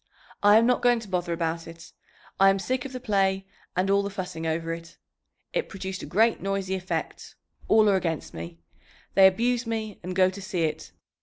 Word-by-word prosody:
"I 205 +1 +7
am 230 - +5
not 250 0 +2
going 245 -1 +4
to 220 - -10
bother 180 -2 -2
about 165 0 -2
it. 165 0 -12 0.5
I 195 0 +7
am 195 - +3
sick 250 +6 -2
of 275 - -6
the 255 - -5
play 195 -5 +1 0.3
and 185 +1 +1
all 200 +1 +3
the 200 - -3
fussing 180 -5 -5
over 165 +1 -1
it. 165 0 -10 0.6
It - - -1
produced 190 0 -6
a - - -7
great 225 +5 +2
noisy 195 -1 -2
effect. 190 0 -4 0.3
All 215 -1 +5
are 200 - +4
against 165 -5 -3
me... 85 +1 -7 0.6
they 195 -1 +8
abuse 235 +5 0
me 220 -2 -4
and 180 +1 -5
go 185 0 +4
to 200 +1 -9
see 185 -2 -2
it. 155 - -3
190 Hz, 205 wpm, -26 LUFS, 170-215 Hz, 0.6 s, they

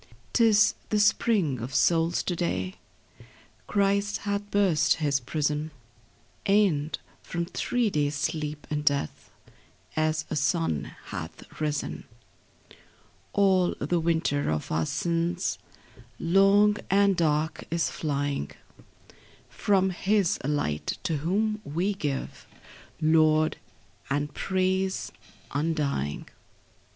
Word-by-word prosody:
'Tis 215 -3 +5 0.2
the 210 - +2
spring 200 - +2
of 125 +4 -5
souls 165 0 +3
to 180 - -2
day: 95 - -2 0.9
Christ 200 0 +1
hath 205 0 -2
burst 195 -7 +3
His 145 -3 +1
prison; 150 +3 -1 0.7
And, 175 -8 +2 0.2
from 170 0 -3
three 235 +5 -1
days' 145 -2 0
sleep 150 0 -3
in 150 0 0
death, 140 - -1 0.7
As 155 0 0
a - - 0
sun 80 - 0 0.2
hath 80 -1 -6 0.2
risen: 150 -2 -2 1.3
All 190 -3 +3
the 175 - 0
winter 160 -3 0
of 75 -1 -2
our 80 0 0
sins, 170 +1 -1 0.6
Long 195 +4 +4
and 200 0 +4
dark, 155 -1 0
is 170 0 0
flying 145 - -2 1.0
From 190 -2 +2
His 195 0 +1
light, 130 - -1
to 165 -6 0
whom 210 +8 0
we 175 +8 -1
give 145 -8 -4 0.5
Laud 155 -1 +3 0.5
and 145 +1 -1
praise 190 0 -1 0.4
undying. 145 - -1
165 Hz, 100 wpm, -27 LUFS, 145-195 Hz, 1.3 s, Tis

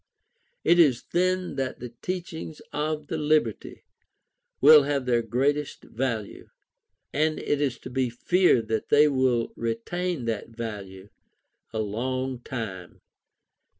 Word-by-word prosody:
It 175 - +4
is 135 -7 +5
then 185 -3 0
that 135 -1 -2
the 120 -1 -8
teachings 170 -4 -5
of 150 0 -2
the 160 +2 -3
Liberty 150 -7 0 0.8
will 150 +2 +9
have 140 -2 -1
their 120 -2 +2
greatest 135 +6 -1
value. 115 -4 -4 0.6
And 155 +2 +1
it 145 0 -1
is 135 -4 0
to 130 - -8
be 130 -1 0
feared 125 -1 +2
that 110 -1 -1
they 150 +1 +6
will 130 -4 +1
retain 125 +7 -3
that 115 -1 -3
value 105 -4 -7 0.6
a - - -4
long 130 +4 -2
time. 110 -9 -7
130 Hz, 125 wpm, -26 LUFS, 115-150 Hz, 0.8 s, will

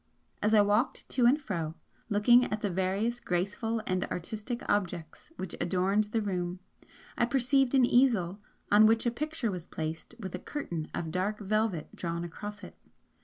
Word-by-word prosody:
As 215 +1 +3
I 210 - +7
walked 210 +5 +1
to 245 -2 +3
and 275 +5 +4
fro, 165 - -3 0.3
looking 240 +4 +5
at 215 0 -3
the 205 - -1
various 195 +6 0
graceful 210 +5 -1
and 185 0 0
artistic 215 +7 -5
objects 180 - -2
which 190 -2 -5
adorned 190 +4 +2
the 215 +1 -1
room, 180 -2 -2 0.6
I - - +5
perceived 270 +1 +2
an 260 -2 +6
easel, 220 -8 +3 0.3
on 210 +1 +8
which 225 +1 +3
a 240 - +2
picture 295 -2 -2
was 180 -2 -6
placed 160 +7 -5
with 190 -5 -6
a 180 - -4
curtain 170 - -5
of 160 -2 -3
dark 190 +4 -1
velvet 210 -5 -1
drawn 170 -1 -3
across 205 +5 -7
it. - - -10
205 Hz, 170 wpm, -30 LUFS, 180-235 Hz, 0.6 s, on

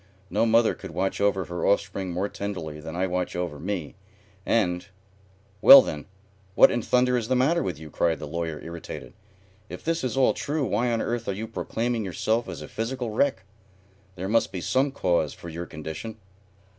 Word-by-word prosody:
No 115 - +2
mother 115 0 +4
could - - -9
watch 95 +5 -2
over 100 -2 +2
her 85 0 -5
offspring 100 -1 0
more 90 +4 -1
tenderly 90 -8 -5
than 80 +2 -7
I 90 +2 +1
watch 90 -1 -2
over 85 -5 -3
me, 90 -3 -4 0.5
and 90 -5 +1 0.4
" 95 +1 -33
"Well, - - +11
then, 75 - -6 0.5
what - - +7
in 120 - 0
thunder 125 +2 +2
is 115 -2 -2
the 130 - +1
matter 140 +7 +3
with 90 -5 -3
you?" 80 0 -11
cried 80 +2 +1
the - - -7
Lawyer, 80 0 -4
irritated. 85 0 -8 0.6
"If - - -8
this 165 -1 0
is 130 -1 -2
all 135 - +4
true, 145 -1 -2
why 120 +2 0
on 115 -1 0
earth 120 0 -3
are 100 - 0
you 110 +4 -5
proclaiming 115 +1 -2
yourself 110 +5 -1
as - - -6
a - - -8
physical 120 +1 -3
wreck? 110 -3 +1 0.7
There 95 +1 -4
must 115 +3 +2
be 95 - -4
some 130 - +1
cause 85 - 0
for 85 - -9
your 85 +2 -6
condition." 80 +9 -7
100 Hz, 195 wpm, -26 LUFS, 85-115 Hz, 0.7 s, Well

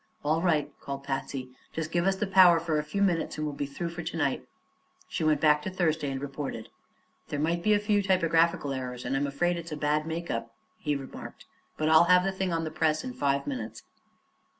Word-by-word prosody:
"All 155 +2 +2
right," 160 -5 +2
called 140 0 -6
Patsy; 135 -1 -4 0.2
"just 160 0 -3
give 175 +2 +1
us 195 - +3
the 200 - -1
power 185 -3 +7
for 165 -2 0
a - - -2
few 175 +7 -1
minutes, 170 -6 0
and 155 - -2
we'll 150 -1 -3
be 140 - -3
through 170 +5 -4
for 170 +1 -6
to 165 0 -5
night." 145 -4 0 0.6
She - - -3
went 155 -2 +3
back 150 0 +4
to 190 - -4
Thursday 160 -5 0
and 135 -1 -3
reported. 135 -4 -5 0.6
"There 145 - -3
may 160 +4 +1
be 210 +5 +3
a - - +2
few 205 0 +2
typographical 170 -6 +2
errors, 125 -1 -5
and 130 +2 -1
I'm 140 +1 +1
afraid 175 +5 0
it's 170 -1 -7
a 150 - -3
bad 150 +1 0
make 170 +1 -3
up," 115 0 -4 0.2
he 150 -8 -1
remarked; 135 -1 -8 0.3
"but 155 - 0
I'll 160 +1 +7
have 180 +1 +5
the 195 - 0
thing 190 -1 -2
on 165 -1 0
the 155 - -4
press 155 -1 +1
in 255 - -5
five 140 - 0
minutes." 270 -3 -5
160 Hz, 225 wpm, -28 LUFS, 145-175 Hz, 0.6 s, power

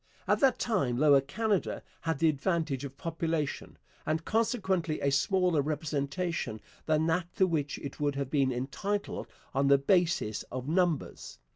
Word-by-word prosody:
At - - +3
that 270 -2 +4
time 135 - 0
Lower 140 -1 +6
Canada 205 +8 -1 0.2
had 165 -2 -1
the 165 - +3
advantage 155 -2 0
of 140 -1 -7
population, 165 -3 -3 0.3
and 160 +1 -1
consequently 190 -8 0
a 140 - +1
smaller 180 +2 +2
representation 145 -2 -2 0.3
than 155 0 +2
that 170 +2 0
to 190 - +4
which 150 -5 -1
it 140 +1 -7
would 145 -1 0
have 140 -2 -3
been 135 -3 +2
entitled 145 +11 -3 0.3
on 135 0 +2
the 140 0 +7
basis 170 - +1
of 130 +1 -5
numbers. 170 -1 -1
155 Hz, 150 wpm, -30 LUFS, 140-180 Hz, 0.3 s, the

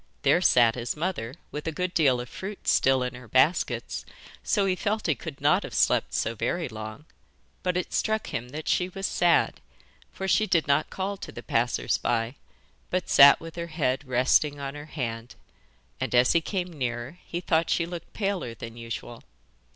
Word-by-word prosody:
There - - +4
sat 120 -2 +5
his 120 0 -3
mother, 150 -8 -3 0.2
with 150 +1 -5
a - - 0
good 180 +3 -3
deal 135 -6 +3
of 125 - -5
fruit 195 +8 -8
still 130 -1 +4
in 125 - -3
her 125 0 -11
baskets, 130 - +1 0.4
so 205 -3 +1
he 185 -1 +1
felt 215 +3 -1
he 160 - +3
could 150 -1 -8
not - - +3
have - - -7
slept - - +2
so 115 - 0
very 120 - -2
long, 110 +4 -8 0.6
but 180 -1 0
it 180 - -3
struck 220 0 -1
him 120 +2 -3
that 150 +4 -7
she 180 0 +1
was 195 +1 -5
sad, - - +2 0.5
for 190 - -5
she 215 +3 +3
did 165 -6 +2
not 140 +2 +2
call 195 +1 -3
to - - -8
the - - -9
passers 120 +2 0
by, 115 0 0 0.6
but 180 -1 -2
sat 140 0 +8
with 165 0 -9
her 170 0 -4
head 145 -5 -1
resting 130 +3 +2
on 140 -1 -4
her 145 0 -8
hand, 120 -6 -5 0.6
and - - -1
as 125 +1 +5
he 170 - +3
came 180 0 -3
nearer 125 +3 -4
he 175 - -4
thought 165 -2 +1
she 170 - +2
looked 170 -1 -8
paler 195 - -2
than 115 0 -8
usual. 115 0 -7
150 Hz, 190 wpm, -27 LUFS, 125-180 Hz, 0.6 s, sat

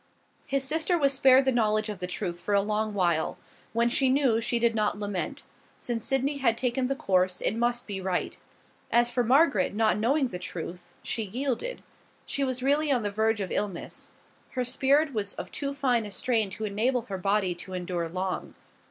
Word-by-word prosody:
His 275 0 0
sister 320 +5 +1
was 280 -3 +3
spared 265 0 +6
the 265 - +3
knowledge 215 -3 +2
of 210 -3 -5
the 180 - -3
truth 180 -1 -4
for 205 - 0
a 200 - +5
long 215 0 -1
while. 170 -5 +1 0.3
When 235 +1 +2
she 260 +2 +2
knew, 260 -4 +3
she 235 - 0
did 235 0 +2
not 210 -2 0
lament; 205 +7 -3 0.3
since 235 -2 -3
Sydney 270 +1 +1
had 235 -4 +2
taken 250 +1 0
the 275 - -1
course, 185 -10 +1
it 215 - +1
must 240 +1 0
be 195 -2 -5
right. 185 -1 -1 0.6
As 240 0 +3
for 245 0 +1
Margaret, 250 - +3
not 215 -1 +2
knowing 265 +4 +2
the 180 - -6
truth, 175 0 -7
she 230 - -2
yielded. 255 - -3 0.4
She 280 - -1
was 255 -1 -2
really 290 +2 +2
on 245 -4 +2
the 205 - -1
verge 220 +1 +1
of 190 - -4
illness. 195 -5 -4 0.4
Her 255 -1 -2
spirit 275 +4 +2
was 205 -3 -3
of - - -7
too 280 -1 -3
fine 250 -6 +1
a - - -9
strain 225 -1 0
to 215 +3 -5
enable 230 +4 0
her 195 -3 -5
body 195 -1 +1
to 175 +2 -9
endure 175 -2 -3
long. 185 +2 -3
230 Hz, 195 wpm, -28 LUFS, 200-265 Hz, 0.6 s, spared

